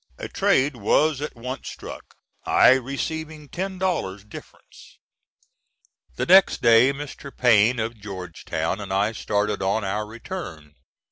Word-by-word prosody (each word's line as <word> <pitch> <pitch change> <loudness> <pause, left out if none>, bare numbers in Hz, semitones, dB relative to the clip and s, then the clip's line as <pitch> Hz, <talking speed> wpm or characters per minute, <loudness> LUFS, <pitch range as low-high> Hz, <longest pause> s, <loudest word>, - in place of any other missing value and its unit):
A - - -6
trade 135 +1 +1
was 140 +7 +2
at 150 - -5
once 125 +3 -6
struck, - - -10 0.3
I - - +5
receiving 150 +4 -2
ten 190 +1 -4
dollars 160 - -2
difference. 105 - -14 1.2
The - - -2
next 190 +2 +6
day 115 +3 +6
Mr. 140 0 -8
Payne, 120 -2 +3
of 115 +1 -3
Georgetown, 90 -3 -4
and 100 - -7
I 100 +3 +1
started 105 -2 -1
on 100 +3 0
our 105 +2 -2
return. 105 - -8
115 Hz, 130 wpm, -23 LUFS, 100-145 Hz, 1.2 s, next